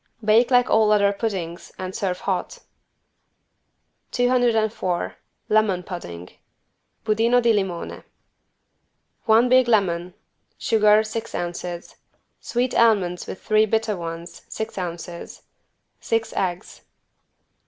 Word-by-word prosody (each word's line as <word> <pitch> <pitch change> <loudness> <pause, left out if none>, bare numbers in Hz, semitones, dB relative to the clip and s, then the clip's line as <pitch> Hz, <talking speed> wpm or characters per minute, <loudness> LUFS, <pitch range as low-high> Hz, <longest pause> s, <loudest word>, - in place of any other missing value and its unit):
Bake 225 +3 +4
like 245 -1 +4
all 215 -1 +3
other 200 -1 +4
puddings 185 -5 -4
and 185 0 -5
serve 185 -2 -2
hot. 190 -2 -2 1.5
204 230 -7 +1 0.3
LEMON 210 -4 +2
PUDDING 90 - -8 0.8
(Budino 225 +3 +3
di 235 -1 +3
limone) 190 -5 -3 1.2
One 225 +2 +5
big 255 0 +4
lemon. 180 -5 +1 0.4
Sugar, 215 -2 +4
six 220 +1 -5
ounces. 175 0 -5 0.4
Sweet 250 +1 -1
almonds 195 -7 +2
with - - -8
3 215 0 +3
bitter 220 0 0
ones, 170 -1 -7
six 220 +1 -5
ounces. 175 -1 -7 0.6
Six 225 0 -1
eggs. 180 +1 -3
210 Hz, 100 wpm, -23 LUFS, 180-225 Hz, 1.5 s, One